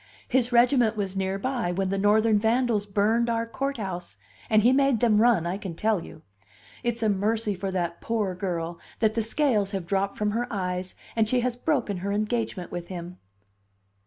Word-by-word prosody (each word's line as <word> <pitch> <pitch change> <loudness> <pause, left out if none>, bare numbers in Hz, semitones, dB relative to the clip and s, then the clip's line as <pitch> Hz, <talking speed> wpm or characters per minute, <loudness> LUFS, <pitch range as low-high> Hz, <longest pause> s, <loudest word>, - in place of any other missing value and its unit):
His 250 -1 +1
regiment 240 -2 +4
was 195 -2 -2
near 190 0 -1
by 240 -4 -1
when 190 +1 -1
the 195 0 -1
Northern 215 +1 +4
vandals 225 -1 +1
burned 220 +4 +2
our 230 0 0
courthouse, 210 - -4 0.3
and 215 -1 +4
he 245 +3 +5
made 275 -3 +3
them 215 -3 +4
run, 230 -8 +4
I 175 +3 -2
can 190 -5 -6
tell 210 -2 0
you! 155 - -12 0.6
It's 235 -1 -2
a - - +3
mercy 210 +2 0
for 195 +1 -4
that 175 -2 -2
poor 215 -5 -1
girl 175 -2 -3 0.2
that 220 -1 +2
the 225 - 0
scales 225 -3 +1
have 190 -3 -3
dropped 195 +2 -1
from 210 0 0
her 240 +3 -1
eyes 185 -2 -3 0.2
and 220 -1 +2
she 250 0 +2
has 245 0 -1
broken 245 - -1
her 195 +3 -3
engagement 210 -3 -2
with 175 -1 -5
him." 180 0 -7
210 Hz, 190 wpm, -26 LUFS, 190-235 Hz, 0.6 s, he